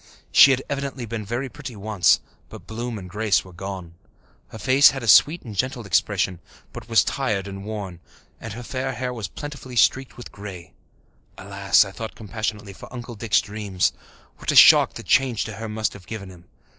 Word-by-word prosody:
She - - +8
had 135 0 +1
evidently 140 -3 -4
been 115 -1 -5
very 120 +6 -3
pretty 130 -2 -9
once, 105 -2 +2 0.3
but - - -12
bloom 115 +1 -5
and 95 -2 -8
grace 105 +1 0
were 90 - -14
gone. 95 -2 -7 0.5
Her - - -10
face 130 +5 +6
had 135 -2 -5
a - - -5
sweet 155 - +6
and 110 -4 -9
gentle 125 +1 -2
expression, 90 0 0 0.3
but - - -10
was 115 - +5
tired 105 -8 -2
and 100 0 -7
worn, 100 -5 -6 0.4
and 110 - -7
her 120 +3 -8
fair 130 +2 -3
hair 125 0 -4
was 110 -6 -5
plentifully 140 - -8
streaked 130 +2 +2
with 120 - -10
grey. 95 -4 -10 0.6
Alas, 100 +1 +2
I 95 - -8
thought 110 +3 -7
compassionately, 105 -1 -5
for - - -13
Uncle 120 -1 -7
Dick's 110 -1 +1
dreams! 100 -4 -1 0.4
What - - -2
a - - -2
shock - - +8
the - - -7
change 130 -5 +2
to 110 - -7
her 115 0 -6
must 110 0 -2
have 95 -3 -14
given 100 -4 -7
him! 90 -1 -16
110 Hz, 195 wpm, -23 LUFS, 100-125 Hz, 0.6 s, She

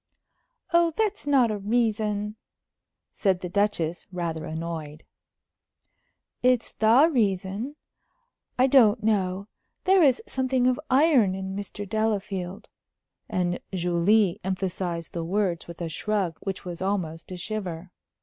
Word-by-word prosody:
"Oh, 340 -1 +4
that's 420 -6 -1
not 260 -5 +4
a 210 - -3
reason," 210 -1 0 0.8
said 190 -3 0
the 180 - -4
Duchess, 180 -4 0
rather 165 -3 -3
annoyed. 160 -1 -5 1.4
"It's 250 -2 +2
the 230 +8 +5
reason. 205 +3 0 0.8
I 255 - +5
don't 245 -5 +5
know 200 -2 0 0.4
there 380 0 +5
is 275 -5 +5
something 260 -7 0
of 255 +1 +2
iron 260 - +4
in 190 0 -5
Mr. 205 0 -5
Delafield;" 200 -3 -2 0.6
and 180 -3 -1 0.2
Julie 180 +3 +2
emphasized 185 -3 -3
the 170 - -3
words 180 -1 -1
with 170 -1 -10
a 170 - -2
shrug 185 0 -2
which 195 -1 -5
was 175 -1 -6
almost 185 -4 -2
a 180 - -5
shiver. 180 -3 -5
200 Hz, 120 wpm, -26 LUFS, 180-225 Hz, 1.4 s, the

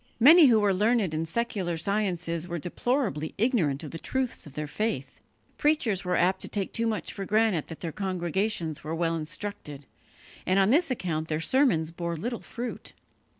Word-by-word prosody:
Many 310 +6 +9
who 230 -3 +5
were 205 -2 +3
learned 210 -2 +2
in 160 +1 -2
secular 190 -4 -2
sciences 175 -3 -1
were 175 -1 -3
deplorably 175 - -1
ignorant 190 - +1
of 150 - -7
the 165 - -6
truths 260 -6 -3
of 140 - -12
their 150 +1 -3
faith. 145 - -3 0.4
Preachers 275 - +2
were 180 -1 0
apt 185 +2 +2
to - - -4
take 200 -2 -3
too 230 0 0
much 220 -2 -3
for 195 - -5
granted 210 -5 +1
that 165 - -9
their 165 - -3
congregations 185 -2 -2
were 155 +2 -3
well 165 0 0
instructed, 155 -3 -6 0.6
and 185 +2 +1
on 195 +2 +4
this 325 +4 +4
account 165 -10 -2
their 155 -1 -1
sermons 165 - +2
bore 170 0 -4
little 235 +8 -4
fruit. 240 +1 -6
185 Hz, 180 wpm, -27 LUFS, 165-225 Hz, 0.6 s, Many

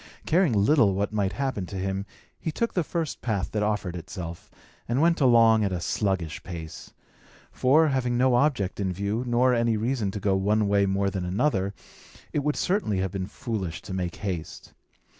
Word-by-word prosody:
Caring 170 -4 +3
little 105 -1 +4
what 100 +2 -1
might 100 -2 0
happen 130 -9 -2
to 100 - -8
him, 95 +1 -3 0.3
he 160 - -3
took 230 +9 -1
the 180 - +1
first 165 -1 -3
path 105 -6 -2
that 105 - -1
offered 105 -4 -1
itself, 85 -1 -7 0.4
and 120 +3 +1
went 165 +1 +3
along 115 -4 +5
at 100 - 0
a 90 - -2
sluggish 90 -3 -1
pace; 80 -3 -8 0.6
for, 150 +5 +4
having 125 -3 0
no 130 0 +3
object 120 -8 +1
in 95 -2 0
view, 100 +6 -2
nor 125 +2 +3
any 115 -2 +2
reason 115 -1 -1
to 105 - -4
go 100 -1 +1
one 105 +2 +2
way 100 0 +3
more 100 0 0
than 95 -2 -3
another, 100 0 0 0.6
it - - +1
would 150 +1 0
certainly 180 - 0
have 95 -1 -1
been 95 -1 -3
foolish 100 -9 -4
to 95 - -7
make 90 -2 -3
haste. 90 -6 -6
105 Hz, 185 wpm, -26 LUFS, 95-125 Hz, 0.6 s, along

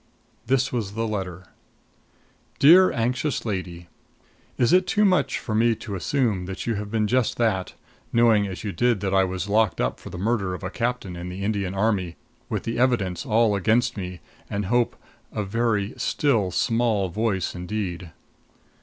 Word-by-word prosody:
This 135 +1 +1
was 105 -5 -2
the 115 +1 -1
letter: 95 -4 -4 1.1
DEAR 180 +6 +7
ANXIOUS 125 +5 -1
LADY: 90 -5 -4 0.7
Is 120 +6 +3
it 185 0 +4
too 210 +3 +3
much 185 -2 +2
for 110 - -5
me 115 +1 +3
to 105 -1 -8
assume 100 -2 0
that 95 +1 -5
you 115 - 0
have 105 -1 -4
been 110 0 0
just 125 +2 +1
that, 105 -6 0 0.4
knowing 115 -3 +4
as 95 -2 -7
you 105 - -2
did 120 0 +1
that 95 -1 -1
I 95 0 +5
was 95 0 -3
locked 105 -4 +2
up - - -1
for - - -10
the - - -7
murder 100 -2 0
of 90 - -10
a 95 - -4
captain 120 -6 -2
in 85 +1 -6
the 95 +2 -6
Indian 100 -2 -1
Army, 95 -4 0 0.3
with 105 -4 -2
the 115 +1 -3
evidence 120 -4 +1
all 110 -2 +3
against 115 +5 +2
me 90 -3 -6 0.3
and 100 0 -2
hope 120 +4 +1 0.4
a 105 - -2
very 105 0 0
still 115 -10 +1
small 110 0 +1
voice 105 -1 -1
indeed? 90 -1 -4
105 Hz, 170 wpm, -24 LUFS, 95-120 Hz, 1.1 s, DEAR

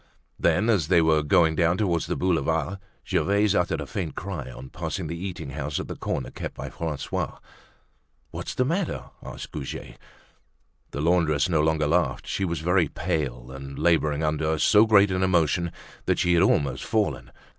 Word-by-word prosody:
Then 90 +7 +2
as 100 -10 +2
they 85 0 +5
were 80 -1 +4
going 80 +2 +4
down 85 +2 +2
towards 90 -6 0
the - - -1
Boulevard, 80 +1 0 0.3
Gervaise 100 +1 +2
uttered 90 -3 +1
a - - -4
faint 85 -8 -4
cry 85 -9 -5
on 65 +1 -10
passing 80 +2 -4
the 80 +2 -4
eating 85 -5 -6
house 75 +1 -3
at - - -5
the - - -5
corner - - -3
kept - - -6
by - - -6
Francois. 80 -4 -3 0.9
"What's - - -5
the 125 - +2
matter?" 170 +5 -2
asked - - -8
Goujet. 70 -3 -7 0.9
The 70 - -4
laundress 80 -3 +2
no 80 -3 +3
longer 80 0 +2
laughed. 85 +4 +1
She 95 - -1
was 85 -3 -2
very 90 0 +3
pale, 70 -7 -3
and 70 0 -8
laboring 80 -3 +2
under 80 +1 0
so 105 +7 +5
great 100 -2 +5
an 95 0 0
emotion 85 -2 +2 0.4
that - - +2
she 90 - +2
had 85 - +4
almost 70 -8 +2
fallen. 70 - -1
80 Hz, 175 wpm, -25 LUFS, 75-95 Hz, 0.9 s, they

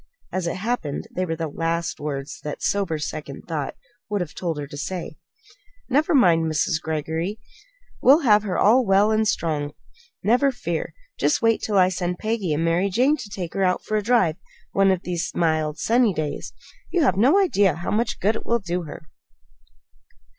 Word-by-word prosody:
As 185 -2 -2
it - - -2
happened, 190 -7 -3
they 185 0 -1
were 165 - -2
the 165 0 -3
last 165 +2 -2
words 140 -1 -5
that 150 - -5
sober 195 -6 0
second 150 -2 -6
thought 155 -5 -3 0.3
would 205 -1 0
have 175 -4 -4
told 170 -4 -3
her 145 - -4
to 145 - -10
say. 165 +1 -5 0.7
"Never 300 +5 +2
mind, 165 -10 +4
Mrs. 155 +1 0
Greggory. 160 +5 -3 0.6
We'll 280 +6 +6
have 210 -6 +5
her 195 -4 -2
all 245 +5 +5
well 200 0 +4
and 220 0 +2
strong 150 -6 -1
soon; 475 +1 -31
never 250 +7 +3
fear! 170 -10 -4 0.2
Just 300 - +1
wait 225 -1 +3
till 210 -2 0
I 185 -1 +5
send 180 -1 -2
Peggy 215 -5 -2
and 155 +2 0
Mary 175 +4 +2
Jane 255 +10 +3
to 245 -7 -8
take 185 -4 -5
her 195 - 0
out 180 -1 +1
for 215 - -2
a 210 - +2
drive 200 -8 +2 0.3
one 195 0 +3
of 190 -1 +1
these 175 -2 -2
mild, 155 -2 +1
sunny 230 -4 +2
days. 150 -2 -3 0.4
You 350 -3 +1
have 220 -10 +3
no 255 - +4
idea 205 - +3
how 175 - -4
much 225 +3 0
good 210 +4 +2
it - - -5
will 235 - +1
do 180 -4 -3
her!" 155 +1 -10
185 Hz, 190 wpm, -23 LUFS, 160-220 Hz, 0.7 s, We'll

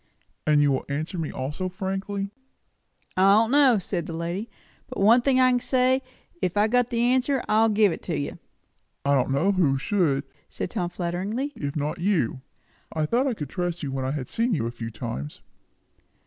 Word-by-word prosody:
"And 150 -1 +5
you 145 - +3
will 130 - -1
answer 155 +5 -3
me 160 - -2
also 150 +8 -3
frankly?" 195 +1 -3 0.8
"I 195 +2 +5
don't 225 +2 +4
know," 275 -5 +6
said 175 -3 -3
the 165 - -5
lady, 170 +7 -3 0.4
"but 255 - -7
one 225 +5 +6
thing 260 0 +3
I 255 0 +5
can 250 - +2
say, 255 +1 +2 0.4
if 180 +2 -1
I've 210 +1 +3
got 245 -1 +3
the 235 -2 0
answer, 255 +2 +2
I'll 220 +1 +4
give 210 -2 +4
it - - -5
to 165 - -2
you." 140 - -4 0.7
"I 140 - +3
don't 135 -2 +2
know 140 +9 +2
who 160 -8 +2
should," 140 -3 +1 0.3
said - - -5
Tom 180 -5 -2
flatteringly, 190 +11 -3
"if 140 -1 -4
not 150 0 -2
you. 170 - 0 0.5
I 155 -1 0
thought 245 - +1
I 250 - 0
could 150 -8 -6
trust 175 -1 -3
you, 140 - -3
when 135 -1 -2
I 130 - -1
had 135 -2 -3
seen 230 -1 0
you 130 - -1
a 115 - -2
few 115 -1 -6
times." 110 - -6
185 Hz, 200 wpm, -25 LUFS, 145-230 Hz, 0.8 s, know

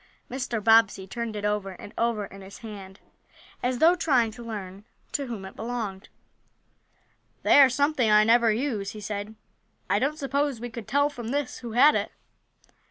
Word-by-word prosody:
Mr. 245 -4 -3
Bobbsey 225 -3 +4
turned 230 +2 -5
it 205 0 -4
over 210 -2 -1
and 205 +4 -11
over 230 -3 0
in 195 0 -12
his 195 +1 -11
hand, 195 -3 -9 0.6
as 250 0 0
though 325 +6 +6
trying 260 -10 +2
to 220 - -11
learn 200 -4 -7 0.3
to 280 -2 -2
whom 220 -5 -6
it 190 - -10
belonged. 220 -5 -5 1.3
"They - - +6
are 270 - +7
something 275 -2 +1
I 210 0 +6
never 230 +1 +4
use," 215 -4 -2
he 215 - -8
said. 210 +1 -5 0.6
"I 200 - +3
don't 285 +5 -1
suppose 280 -3 -1
we 240 +1 -6
could 225 -2 -8
tell, 285 +5 +2
from 240 -5 -7
this, 280 +2 -2
who 235 -3 -7
had 280 +6 +6
it?" - - -1
230 Hz, 175 wpm, -26 LUFS, 210-260 Hz, 1.3 s, are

